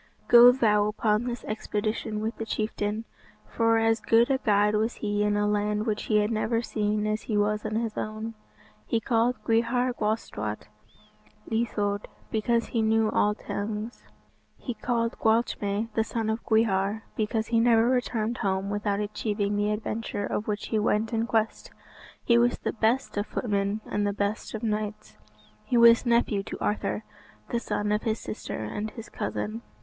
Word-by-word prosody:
"Go 240 +1 +9
thou 210 -5 +3
upon 210 +1 +1
this 240 -1 -4
expedition 215 0 -2
with 225 +2 -2
the 225 - -4
chieftain." 215 0 -2 0.4
For 230 0 +2
as 225 0 +2
good 235 +3 +4
a 265 - +2
guide 210 -3 +3
was 220 +2 0
he 205 -1 -1
in 210 0 +2
a 205 - +1
land 210 +1 0
which 215 -2 -2
he 215 - +2
had 210 +2 0
never 225 +1 0
seen 210 -1 -1
as 215 0 -1
he 215 - -2
was 210 +1 +1
in 215 0 -2
his 225 -1 -1
own. 215 +1 -4 0.5
He 230 - +1
called 235 +1 +1
Gwrhyr 240 +2 +1
Gwalstawt 160 - -3 0.9
Ieithoedd, 210 -3 -1 0.3
because 230 +2 +1
he 230 - 0
knew 220 0 +2
all 210 0 +2
tongues. 210 +3 -5 0.6
He 245 - -5
called 230 0 -1
Gwalchmai, 220 -1 0
the 220 - +2
son 225 -1 -2
of 220 +1 -3
Gwyar, 220 -1 +1
because 220 +1 -1
he 230 -1 +3
never 230 0 +4
returned 245 -2 0
home 195 -1 -1
without 205 -1 -1
achieving 205 0 -2
the 205 0 +1
adventure 210 -1 -3
of 210 - -3
which 210 -1 -3
he 220 - +1
went 215 +1 +1
in 225 +1 0
quest. 225 -1 -1 0.5
He 235 0 +4
was 240 +1 +2
the - - -3
best 230 +2 0
of 205 - -1
footmen 205 -1 -1
and 205 0 -1
the 200 - 0
best 205 +2 -2
of 220 - -6
knights. 215 -1 -3 0.5
He 245 - 0
was 235 +1 +6
nephew 235 -3 +2
to - - -7
Arthur, 210 +1 -1 0.5
the 235 - 0
son 210 -2 -2
of 210 +1 +1
his 220 -1 -1
sister, 210 - -5
and 210 - -4
his 225 0 -10
cousin. 220 +2 -4
220 Hz, 170 wpm, -27 LUFS, 210-230 Hz, 0.9 s, Go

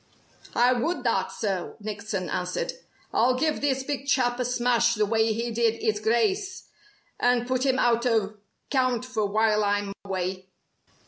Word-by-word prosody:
"I 245 +1 +5
would 315 +9 -1
that, - - 0
sir!" 195 -5 -3
Nickson 205 -3 -4
answered. 180 0 -2 0.4
"I'll 250 +2 +3
give 305 +3 0
this 270 -2 0
big 280 0 -4
chap 250 -3 +2
a 250 - 0
smash 240 -1 +2
the 210 -1 +2
way 220 +1 +2
he 235 +2 -2
did 230 0 +2
'is 215 -2 -1
Grice, 375 - 0 0.5
and 245 0 +2
put 255 +1 0
him 260 0 +2
out 240 -1 +2
o' 215 -3 0 0.3
count 255 -3 +1
for 220 -5 -1
while 215 +1 +2
I'm 205 -1 0
way." 185 -1 -3
235 Hz, 155 wpm, -26 LUFS, 210-255 Hz, 0.5 s, I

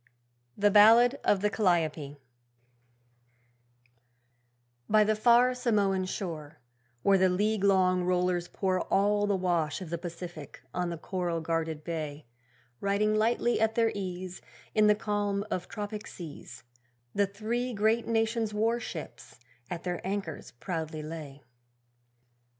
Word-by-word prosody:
The 205 0 +3
Ballad 230 +5 +7
of 195 - +2
the 210 0 +1
'Calliope' 160 -8 0 2.7
By 215 0 +5
the 215 +1 +1
far 240 +3 +5
Samoan 205 -6 +1
shore, 165 -6 -5 0.5
Where 195 -1 +4
the 185 0 +4
league 205 +3 0
long 185 -2 +3
rollers 180 -1 +1
pour 185 -1 -1
All 205 +1 +3
the 200 - +2
wash 175 -5 0
of 180 -4 -8
the 170 - -2
Pacific 170 -6 -8
on 180 -1 -1
the 170 - -4
coral 175 0 -2
guarded 160 -1 -2
bay, 155 -3 -5 0.5
Riding 200 +2 +1
lightly 230 +2 +1
at 220 0 +2
their 230 -1 +3
ease, 185 -2 -5 0.3
In 215 -1 +4
the 210 - +5
calm 205 -1 -1
of 180 - -2
tropic 210 0 -6
seas, 145 -7 -10 0.5
The 200 0 +2
three 225 +5 -3
great 220 +1 +1
nations' 225 -1 0
warships 225 -6 -3 0.3
at 170 -1 -5
their 180 -1 -3
anchors 190 -5 -4
proudly 160 +2 -5
lay. 150 -3 -8
195 Hz, 125 wpm, -29 LUFS, 170-215 Hz, 2.7 s, Ballad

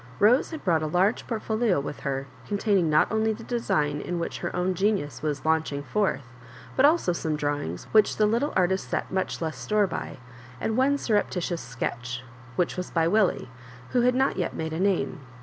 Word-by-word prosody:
Rose 235 +6 +4
had 320 -2 -7
brought 165 -4 +2
a 155 - -1
large 185 +7 +1
port 225 -3 -3
folio 220 -6 +1
with 140 +1 -5
her, 135 -1 -2 0.2
containing 200 -4 +2
;iot 155 0 +5
only 220 0 +2
the 225 +2 -9
design 150 - 0
in 175 - -3
which 170 - -3
her - - -4
own 180 +1 +1
genius 185 - 0
was 150 -1 -2
launching 160 -3 +1
forth, 200 -3 0 0.5
but 265 - +5
also 300 - +3
some 160 -2 -2
drawings 145 - -2
which 215 -1 +4
the 215 - +4
little 235 +8 +1
artist 190 +1 +1
set - - -2
much 190 -2 -2
less 160 -4 -3
store 210 -1 +2
by, 180 - -5 0.4
and 220 - -1
one 270 +3 +3
surreptitious 185 -8 0
sketch, 120 0 -4 0.3
which 175 +4 0
was 180 - -3
by 165 -1 +2
Millie, 200 - +2 0.4
who 245 - +3
had 250 +1 +3
not 265 +1 +2
yet 180 - -2
made 160 0 -3
a 160 - -3
name. 190 -3 +1
180 Hz, 195 wpm, -26 LUFS, 155-220 Hz, 0.5 s, iot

